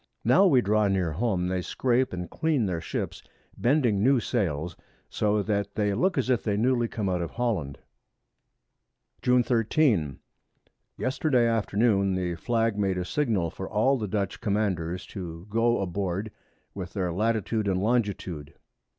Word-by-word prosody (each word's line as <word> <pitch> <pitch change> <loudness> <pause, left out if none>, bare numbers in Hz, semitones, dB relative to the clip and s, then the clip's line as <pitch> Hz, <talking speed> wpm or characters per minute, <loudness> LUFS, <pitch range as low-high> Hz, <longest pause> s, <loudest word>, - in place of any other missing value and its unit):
Now 195 - +6
we 130 -8 +5
draw 105 0 +2
near 95 -4 0
home, 90 0 0
they 90 0 -1
scrape 125 +6 0
and 90 -1 -5
clean 155 -7 0
their 90 -4 -2
Ships, - - -4 0.3
bending 120 -6 +2
new 130 +3 +4
Sails, 85 - -2 0.4
so 105 0 +1
that 100 -1 -2
they 105 -1 +1
look 180 - +1
as - - +1
if 125 -3 0
newly 120 +3 +2
come 105 -3 -3
out 90 -2 0
of 85 - -3
Holland. 100 - -2 1.4
June 125 0 +4
13. 115 - +1 0.8
Yesterday 130 -1 +1
Afternoon 105 -3 +2
the 90 -1 -1
Flag 115 +4 0
made 95 -2 +1
a 90 - -2
Signal 105 - 0
for 95 - -7
all 110 +6 +2
the 105 - -3
Dutch 100 0 -2
Commanders 100 -5 -1
to 85 -3 -8
go 115 +2 +2
aboard 95 +2 -2 0.4
with 95 -3 -7
their 90 -4 -1
Latitude 110 +1 0
and 95 -2 +1
Longitude. 95 -8 -1
105 Hz, 150 wpm, -27 LUFS, 90-120 Hz, 1.4 s, Now